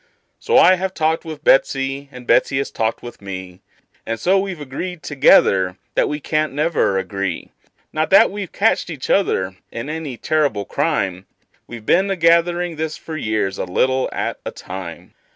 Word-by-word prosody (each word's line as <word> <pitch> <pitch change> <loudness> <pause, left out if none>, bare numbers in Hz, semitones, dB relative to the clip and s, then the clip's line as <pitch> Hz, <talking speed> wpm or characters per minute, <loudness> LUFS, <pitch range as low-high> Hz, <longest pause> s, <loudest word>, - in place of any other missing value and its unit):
So 465 - +2
I 185 0 +7
have 190 +1 -3
talked 160 +1 0
with 155 -2 -8
Betsey, 135 +1 +2
and 125 -2 -11
Betsey 135 - +3
has 135 - -2
talked 110 0 -2
with 120 -3 -10
me, 95 -2 -8 0.4
And 115 0 -4
so 190 +2 +3
we've 190 -4 -4
agreed 155 +5 -6
together 100 - +4 0.2
that - - +1
we 150 - -3
can't 155 0 -1
never 150 - +1
agree; 95 -2 -3 0.4
Not 155 0 0
that 195 - +6
we've 200 -2 -6
catched 210 -3 +1
each 145 -6 -4
other 95 - +1
in 115 +6 -5
any 155 -6 -5
terrible 145 -11 0
crime; 95 -1 -1 0.4
We've 115 -2 -9
been 190 - +3
a 195 - 0
gathering 170 0 +2
this 155 0 -3
for 160 - -8
years, 110 -7 -1
a - - -1
little 130 +8 +1
at - - -3
a - - -4
time. 90 -2 -9
145 Hz, 170 wpm, -20 LUFS, 105-165 Hz, 0.4 s, I